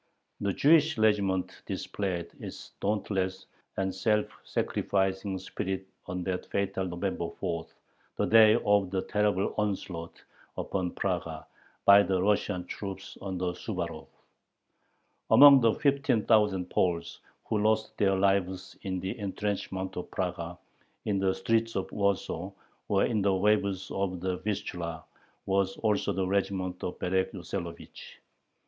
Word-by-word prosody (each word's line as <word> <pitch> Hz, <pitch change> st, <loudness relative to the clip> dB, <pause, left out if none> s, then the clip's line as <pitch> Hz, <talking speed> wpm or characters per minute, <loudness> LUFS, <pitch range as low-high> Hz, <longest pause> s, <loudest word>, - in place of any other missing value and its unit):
The 100 Hz, -, 0 dB
Jewish 155 Hz, -, +4 dB
regiment 100 Hz, -4 st, +1 dB
displayed 90 Hz, -4 st, -3 dB
its -, -, -8 dB
dauntless 95 Hz, -2 st, -1 dB, 0.3 s
and 95 Hz, -1 st, 0 dB
self 105 Hz, +3 st, +2 dB, 0.2 s
sacrificing 95 Hz, 0 st, -1 dB
spirit 95 Hz, 0 st, -4 dB, 0.2 s
on 90 Hz, 0 st, -3 dB
that 90 Hz, 0 st, -3 dB
fatal 100 Hz, -1 st, -1 dB
November 85 Hz, -1 st, -2 dB
fourth, 85 Hz, -4 st, -4 dB, 0.4 s
the -, -, +2 dB
day 110 Hz, -1 st, +7 dB
of 100 Hz, -2 st, +3 dB
the 95 Hz, 0 st, -1 dB
terrible 105 Hz, -2 st, +1 dB
onslaught 95 Hz, -5 st, -3 dB, 0.3 s
upon 90 Hz, -2 st, -2 dB
Praga 85 Hz, -4 st, -2 dB, 0.4 s
by 100 Hz, 0 st, +9 dB
the 95 Hz, -1 st, +1 dB
Russian 100 Hz, -2 st, +1 dB
troops 95 Hz, 0 st, -7 dB
under 90 Hz, -2 st, -2 dB
Suvarov. 90 Hz, -5 st, -5 dB, 1.2 s
Among 140 Hz, -2 st, +9 dB
the 115 Hz, -2 st, +4 dB
fifteen 140 Hz, -6 st, +2 dB
thousand 105 Hz, -5 st, +3 dB
Poles 85 Hz, -2 st, 0 dB, 0.3 s
who 110 Hz, -, 0 dB
lost 110 Hz, +1 st, +1 dB
their 95 Hz, -2 st, +3 dB
lives 95 Hz, -1 st, 0 dB
in 95 Hz, -1 st, -3 dB
the 95 Hz, +1 st, -3 dB
intrenchments 95 Hz, -1 st, -3 dB
of 90 Hz, -, -5 dB
Praga, 85 Hz, -2 st, -3 dB, 0.5 s
in 100 Hz, -2 st, +1 dB
the 95 Hz, -1 st, +1 dB
streets 115 Hz, +4 st, 0 dB
of 95 Hz, -, -2 dB
Warsaw, 100 Hz, -1 st, -1 dB, 0.4 s
or 100 Hz, -1 st, +3 dB
in 110 Hz, -3 st, 0 dB
the 100 Hz, -1 st, +3 dB
waves 100 Hz, -1 st, +1 dB
of 95 Hz, -2 st, -2 dB
the 90 Hz, 0 st, -2 dB
Vistula, 90 Hz, -4 st, -4 dB, 0.4 s
was 95 Hz, 0 st, +1 dB
also 105 Hz, -2 st, +1 dB
the 95 Hz, 0 st, -1 dB
regiment 95 Hz, -1 st, -1 dB
of 90 Hz, -, -3 dB
Berek 95 Hz, +1 st, 0 dB
Yoselovich. 85 Hz, -2 st, -7 dB
95 Hz, 130 wpm, -29 LUFS, 90-105 Hz, 1.2 s, by